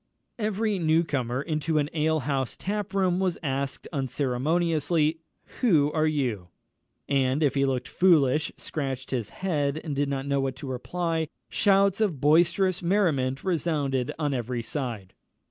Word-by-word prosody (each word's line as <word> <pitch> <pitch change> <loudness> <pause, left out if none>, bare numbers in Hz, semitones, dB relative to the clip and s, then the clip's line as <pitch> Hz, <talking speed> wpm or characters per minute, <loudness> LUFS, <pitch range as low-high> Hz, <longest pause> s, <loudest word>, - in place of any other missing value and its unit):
Every 215 -1 0
new 160 0 +3
comer 130 -4 -2
into 155 0 -1
an 145 -1 +2
alehouse 150 -4 0
tap 205 0 -3
room 185 -2 +2
was 185 -3 0
asked 135 -1 -3
unceremoniously, 150 +4 0 0.4
"Who 155 - +3
are 155 0 +1
you?" 125 - -1 0.6
and 135 +1 +1
if 145 - +3
he 140 -1 +2
looked 125 -2 -1
foolish, 155 -3 +3
scratched 135 -3 -4
his 120 -5 -2
head, 150 -6 -1
and 150 -4 -3
did 140 0 0
not 135 -1 -2
know 140 -1 +1
what 135 -1 -2
to 140 +1 -8
reply, 160 +5 -2 0.2
shouts 200 0 +3
of 185 -10 +1
boisterous 170 +5 +3
merriment 160 -9 +1
resounded 150 -8 0
on 150 -3 -1
every 120 -1 -2
side. 115 -7 -5
150 Hz, 145 wpm, -26 LUFS, 135-170 Hz, 0.6 s, new